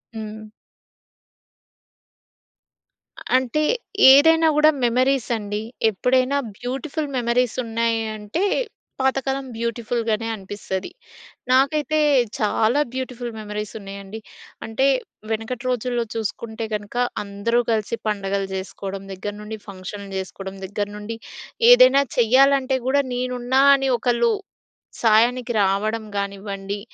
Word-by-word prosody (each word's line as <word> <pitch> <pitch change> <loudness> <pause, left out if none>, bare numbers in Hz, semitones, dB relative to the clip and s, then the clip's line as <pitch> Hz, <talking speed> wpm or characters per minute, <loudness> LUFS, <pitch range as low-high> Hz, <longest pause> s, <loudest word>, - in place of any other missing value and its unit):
హ్మ్. 215 0 -7 2.9
అంటే 260 +4 0 0.5
ఏదైనా 320 +4 +6
కూడా 305 +1 +6
మెమరీస్ 255 +2 +2
అండి. 210 0 -4 0.3
ఎప్పుడైనా 255 +6 +1 0.2
బ్యూటిఫుల్ 280 +5 -4
మెమరీస్ 240 0 +1
ఉన్నాయంటే, 225 - -1 0.6
పాతకాలం 270 0 0
బ్యూటిఫుల్‌గానే 230 -1 -2
అనిపిస్తది. 195 - -5 0.6
నాకైతే 295 +4 +3 0.4
చాలా 220 +4 +2
బ్యూటిఫుల్ 250 -2 -4
మెమరీస్ 210 -1 -5
ఉన్నాయండి. 200 +1 -8 0.5
అంటే, 225 +5 +1 0.4
వెనకటి 225 +3 -3
రోజుల్లో 245 -1 -1
చూసుకుంటే 225 +1 -4
కనక, 210 +2 -5 0.3
అందరూ 200 +4 0
కలిసి 220 +1 0
పండగలు 200 -1 -1
జేసుకోవడం 195 +1 -6
దగ్గర 205 +2 -5
నుండి, 220 +1 -6
ఫంక్షన్‌‌లు 200 +1 -8
జేసుకోవడం 190 +1 -6
దగ్గర 205 +1 -3
నుండి, 215 +2 -6 0.5
ఏదైనా - - +7
చెయ్యాలంటే 265 +2 +4
కూడా, 280 +2 +3
నేనున్నా! 250 +1 0
అని 270 -1 0
ఒకళ్ళు 245 - +2 0.7
సాయానికి 240 +2 +3
రావడం 215 +3 0
కానివ్వండి, 200 0 -4
230 Hz, 95 wpm, -22 LUFS, 205-255 Hz, 2.9 s, ఏదైనా